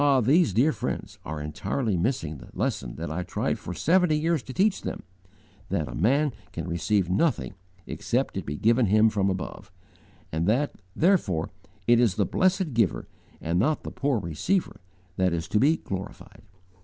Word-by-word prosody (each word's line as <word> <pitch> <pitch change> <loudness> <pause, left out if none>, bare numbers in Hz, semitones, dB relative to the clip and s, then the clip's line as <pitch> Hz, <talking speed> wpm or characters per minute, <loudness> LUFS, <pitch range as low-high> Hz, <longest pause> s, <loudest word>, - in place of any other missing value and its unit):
these 140 - +4
dear 125 +11 +3
friends - - -4
are 75 0 -5
entirely 90 - -2
missing 85 - -1
the - - -13
lesson - - -2
that - - -5
I 85 +3 -2
tried 90 - -2
for - - -7
seventy 165 - +3
years 160 -1 +1
to 130 - -9
teach 195 +7 +2
them,' - - -5
viz., 95 0 -33 0.5
'That - - -7
a - - -7
man 140 - +2 0.2
can - - -5
receive 85 +3 +1
nothing 95 - +1 0.3
except - - -1
it - - -2
be 75 - -4
given 115 +7 +3
him 110 +3 +5
from 100 -2 +1
above,' 95 -3 -5 0.6
and 80 +3 -1
that, 130 +7 +2 0.2
therefore, 155 - +2 0.3
it 120 0 +5
is 115 -6 +3
the 100 - +2
Blessed 185 - +1
Giver, 100 - +1 0.3
and 85 +2 0
not 150 +9 +1
the - - -6
poor 140 -3 0
receiver, 100 - -1 0.4
that 95 -2 +2
is 80 -1 -2
to 105 - +2
be 155 +6 +4
glorified. 95 +3 -7
105 Hz, 175 wpm, -26 LUFS, 85-145 Hz, 0.6 s, him